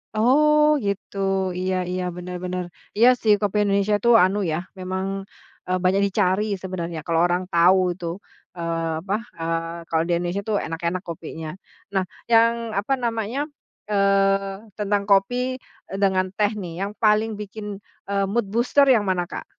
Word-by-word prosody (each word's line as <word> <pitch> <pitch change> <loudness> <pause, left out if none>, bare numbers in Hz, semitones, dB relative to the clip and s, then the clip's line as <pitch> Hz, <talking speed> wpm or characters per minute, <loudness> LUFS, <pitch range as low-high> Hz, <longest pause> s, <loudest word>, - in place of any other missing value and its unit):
Oh 300 +6 +4
gitu, 200 0 -3 0.4
iya 185 0 0
iya, 180 0 -2
bener 180 0 -6
bener. 180 0 -2 0.3
Iya 235 - +6
sih 215 -2 +5
kopi 205 0 0
Indonesia 200 +1 +2
itu 235 +4 +1
anu 190 +3 +2
ya, 155 - 0 0.2
memang, 185 +1 -3 0.6
eee, 185 0 +1
banyak 190 +2 +3
dicari 195 0 +1 0.2
sebenarnya 175 -3 -4
kalau 165 -1 +1
orang 175 +1 +1
tahu 180 +3 +6 0.2
itu, 175 - -7 0.5
eee, 165 -1 -2
apa, 195 +3 -1 0.3
eee, 165 +1 -2
kalau 160 0 +2
di 175 - -2
Indonesia 175 +3 -1
itu 220 - -1
enak-enak 170 +3 -2
kopinya. 160 -1 -6 0.5
Nah 190 - +2 0.3
yang 230 0 +5 0.3
apa 225 +7 -1
namanya, 230 +2 -1 0.5
eee, 195 +1 +1
tentang 205 -1 0
kopi, 245 +6 +2 0.3
eee, 195 - -5
dengan 190 -1 +3
teh 210 -1 +2
nih 175 -3 -6
yang 200 - -5
paling 215 +1 +4
bikin, 210 +1 -7 0.4
eee, 200 0 +1
mood 230 +1 0
booster 245 +5 +4
yang 225 - +3
mana 180 -1 0
Kak? - - -7
195 Hz, 155 wpm, -23 LUFS, 180-215 Hz, 0.6 s, Iya